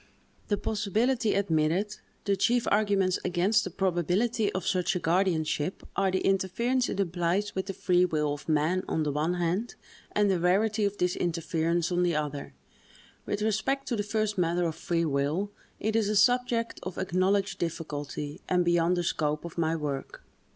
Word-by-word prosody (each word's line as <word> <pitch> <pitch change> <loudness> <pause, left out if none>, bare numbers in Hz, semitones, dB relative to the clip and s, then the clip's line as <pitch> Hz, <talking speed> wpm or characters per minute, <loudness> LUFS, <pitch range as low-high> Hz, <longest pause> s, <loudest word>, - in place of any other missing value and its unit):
The 205 - +1
possibility 220 +3 0
admitted, 185 +2 +1 0.3
the 200 -1 +2
chief 240 +5 +2
arguments 200 -3 +2
against 190 +4 +2
the - - -4
probability 190 +5 0
of 185 -1 -3
such 185 -1 +1
a - - 0
guardianship, 170 -2 0
are 195 -1 +2
the 185 0 0
interference 235 +7 +1
it - - -3
implies 180 +2 0
with 190 0 -3
the 195 - -3
free 180 -1 +3
will 150 -4 0
of 145 +2 -8
man, 155 +4 +2
on 160 - 0
the 150 - 0
one 155 +5 0
hand, 180 +7 -1 0.4
and 210 0 +3
the 190 -3 +2
rarity 205 +5 +2
of 200 0 -2
this 180 0 +1
interference, 170 0 0
on 175 0 +1
the 175 -2 +2
other. 145 - -3 0.7
With 205 0 -1
respect 265 +6 0
to 240 - 0
the 210 - 0
first 210 -1 -1
matter 175 0 +1
of 165 -2 0
free 170 0 -1
will, 150 +7 0 0.3
it 220 +1 -1
is 220 -2 +2
a 215 - 0
subject 235 +2 +2
of 185 0 -6
acknowledged 190 +2 +1
difficulty, 150 -3 -4
and 180 -1 +2
beyond 175 +1 +3
the 175 - 0
scope 150 -2 -1
of 170 - -8
my 165 -1 +1
work. 145 -4 -5
185 Hz, 175 wpm, -28 LUFS, 165-205 Hz, 0.7 s, free